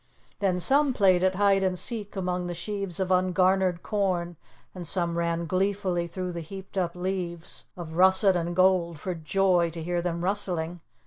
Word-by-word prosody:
Then 185 -3 +1
some 275 - +3
played 190 -5 +4
at 190 0 +2
hide 200 0 +3
and 185 -1 0
seek 210 0 -3
among 180 -1 -2
the 175 - -4
sheaves 195 0 -4
of 190 -1 -1
ungarnered 185 -1 +2
corn, 185 -5 -1 0.4
and 180 -3 -5
some 170 -1 +1
ran 170 0 -1
gleefully 185 -1 0
through 180 +1 -4
the 170 -1 -5
heaped 190 +4 -10
up 180 -3 -1
leaves 180 -2 -4
of 165 -2 -7
russet 190 +2 +4
and 175 0 -2
gold 180 -3 +3
for 185 +3 -3
joy 175 +1 +2
to 165 0 -7
hear 175 +1 -1
them 170 -1 -3
rustling. 175 -3 -2
180 Hz, 175 wpm, -27 LUFS, 170-190 Hz, 0.4 s, played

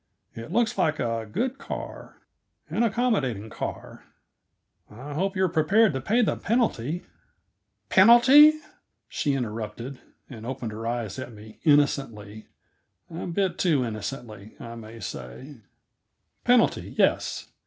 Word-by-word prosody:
"It 115 +6 -8
looks 235 +3 +1
like 155 -1 +1
a 115 -2 -2
good 260 - -2
car 275 - -8 0.5
an - - 0
accommodating 200 - 0
car. - - -7 0.8
I 130 +7 -9
hope 190 +6 -1
you 190 - +1
are - - +4
prepared 180 +5 +3
to 135 - -3
pay 225 - +2
the - - +1
penalty 175 - -1 0.4
" - - -51
"Penalty?" 260 +9 +7 0.5
she 145 - -1
interrupted, 115 +1 -5 0.3
and 110 -4 -10
opened 125 -2 -5
her 110 +2 -6
eyes 115 -3 -3
at 125 - -7
me 110 0 -14
innocently; 125 -8 +1 0.6
a 165 - -5
bit 180 0 -1
too 150 -8 +2
innocently, 110 -1 -7
I 115 0 -8
may 115 0 -10
say. 130 - -8 0.9
"Penalty; 245 -1 +2
yes. - - +1
140 Hz, 130 wpm, -26 LUFS, -, 0.9 s, Penalty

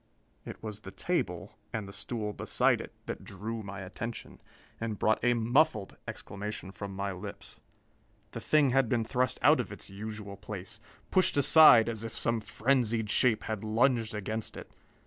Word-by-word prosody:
It - - -9
was 105 -1 -5
the 95 - -9
table, - - -3
and 110 -3 -4
the 100 - -9
stool 105 +1 -3
beside - - +2
it, - - -9
that - - -6
drew 110 +4 -5
my 100 -1 -7
attention 110 +5 -7 0.4
and 115 -2 -3
brought 110 +3 +1
a 120 0 +4
muffled 120 -1 +2
exclamation 100 -1 -6
from 100 -1 -7
my 100 +1 -2
lips. 100 +2 -9 0.7
The - - -6
thing 150 -4 +3
had 135 -2 +3
been 115 -1 +1
thrust 125 +1 0
out - - +6
of - - -3
its - - -9
usual 105 0 -7
place, 105 +1 -8 0.3
pushed 185 -5 +3
aside 140 -5 +8
as 115 -2 -3
if 115 - -6
some 115 -1 +1
frenzied 115 -2 0
shape 115 -4 +3
had 110 -2 -4
lunged 115 0 +2
against 110 +2 -3
it. - - -10
110 Hz, 165 wpm, -30 LUFS, 100-120 Hz, 0.7 s, aside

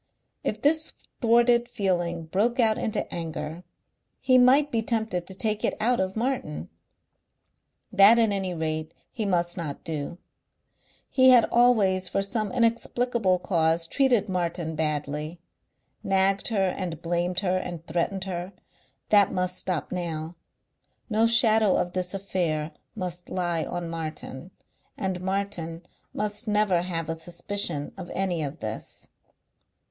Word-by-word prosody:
If - - -3
this 315 +2 +2 0.3
thwarted 240 0 +4
feeling 175 -7 -1
broke 215 +9 0
out 220 -2 +3
into 220 - -1
anger 165 0 -5 0.6
he 255 -1 +4
might 275 +4 +5
be 230 - +1
tempted 220 -6 -1
to 190 - -4
take 215 +1 -1
it - - +1
out 240 +3 +2
of 190 0 -1
Martin. 220 - -2 1.2
That 205 +3 +7
at 225 -2 +4
any 190 -3 -1
rate 155 -1 -3 0.2
he 220 -5 -3
must 175 -2 0
not 155 -5 -5
do. 160 +1 -4 0.9
He 260 -1 +5
had 245 -3 +7
always 205 -7 +3
for 195 - 0
some 215 +1 -1
inexplicable 235 -4 +1
cause 165 -2 +1
treated 245 +1 +2
Martin 170 -3 -2
badly. 150 +1 -2 0.6
Nagged 195 0 +2
her 195 -5 +2
and 175 -4 -4
blamed 175 +2 0
her 185 -2 +1
and 175 -3 -5
threatened 175 +4 -1
her. 185 0 -5 0.6
That 205 -2 +5
must 180 0 -1
stop 180 -5 -3
now. 170 -2 -4 0.8
No 220 +2 +4
shadow 220 -3 +4
of 175 - -1
this 185 +1 -2
affair 170 -5 -1 0.2
must 180 -3 -5
lie 175 -3 0
on 175 -1 -4
Martin.... 160 -2 -6 0.5
And 190 -2 -2
Martin 185 -3 -3 0.3
must 210 +2 -3
never 210 -4 +2
have 165 -3 -3
a 165 - -2
suspicion 170 -2 -3
of 175 - -7
any 185 -4 0
of 145 +1 -5
this.... 110 0 -5
185 Hz, 135 wpm, -26 LUFS, 170-215 Hz, 1.2 s, That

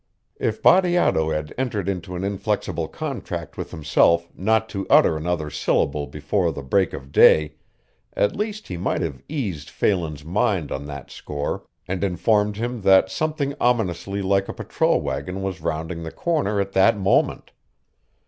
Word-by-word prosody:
If - - -2
Bateato 175 - +4
had 75 -1 -3
entered 110 -8 -2
into 90 -2 -3
an 90 - -4
inflexible 100 -4 -2
contract 95 - -5
with - - -5
himself 85 +3 +2
not 110 +3 +1
to 100 -2 -4
utter - - +6
another 80 -1 -2
syllable 70 0 0
before 85 +4 -1
the 70 - -7
break 95 +8 +1
of 70 0 -8
day 75 0 +6 0.6
at 100 - +1
least 215 +1 -4
he 90 - -5
might 85 - -1
have 70 -6 -4
eased 100 - -4
Phelan's 80 -7 -1
mind 90 -2 0
on 70 +1 -4
that 70 -2 -8
score 75 0 -4 0.2
and 95 +1 -2
informed 105 +3 +1
him 120 0 -3
that 95 -1 +5
something 150 +1 -1
ominously 100 -4 0
like 95 0 +1
a - - -3
patrol - - +1
wagon 95 +1 -4
was 95 -3 -4
rounding 80 +2 -3
the 80 - -5
corner 145 -12 0
at 100 0 -1
that 105 +3 +4
moment. 95 -1 +1
95 Hz, 160 wpm, -23 LUFS, 80-105 Hz, 0.6 s, utter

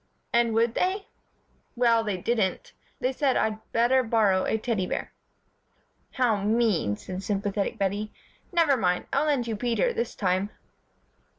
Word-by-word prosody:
'" - - -45
"And 235 -1 +3
would 230 0 +2
they?" 385 - 0 0.7
"Well, 235 -2 +3
they 205 -4 -2
didn't. 230 - -1 0.3
They 255 - 0
said 265 0 +1
I'd 220 0 0
better 240 +3 +3
borrow 215 -5 +2
a - - +1
Teddy 215 -5 -1
bear." - - -4 1.0
"How 245 -5 +2
mean," 210 - +2
said 185 0 -6
sympathetic 200 0 -2
Bettie. 200 +2 -1 0.4
"Nevermind, 270 - +2
I'll 290 +3 +2
lend 280 -5 +1
you 225 -2 -2
Peter, 245 - 0
this 235 - -3
time." 185 0 0
225 Hz, 140 wpm, -26 LUFS, 200-250 Hz, 1.0 s, And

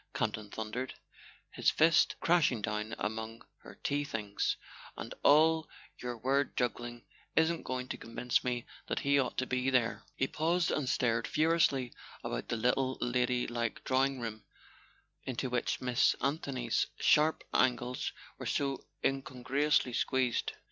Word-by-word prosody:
Campton 105 -1 -2
thundered, 110 +5 -4 0.6
his - - +2
fist 160 0 +4
crashing 165 -8 +3
down 105 0 -2
among 110 +1 -4
her - - -13
tea 145 +1 +1
things; 105 -7 -2 0.4
"and - - -6
all 160 +2 +5 0.3
your 125 -1 -4
word 135 +4 0
juggling 120 -1 -2 0.3
isn't 160 +1 +3
going 130 0 -3
to - - -3
convince 120 +2 -1
me 125 -1 -2 0.2
that - - -1
he 140 0 +3
ought 130 - -1
to 130 - +1
be 130 +1 0
there." 125 -3 +1
He 135 - +1
paused 165 +5 +1
and 140 -4 0
stared 115 -3 +1
furiously 155 -6 +2 0.3
about - - -3
the 115 - -1
little 130 +3 +1
lady¬ 125 0 +1
like 120 -2 -2
drawing 135 0 +1
room 110 -2 -5 0.8
into 130 0 -3
which 125 -1 0
Miss 125 0 +3
Anthony's 135 -4 0
sharp 155 +1 +4
angles 125 0 +1 0.3
were - - -4
so 140 -1 -1 0.2
incongruously 135 0 +1
squeezed. 130 -1 +1
125 Hz, 140 wpm, -32 LUFS, 120-140 Hz, 0.8 s, all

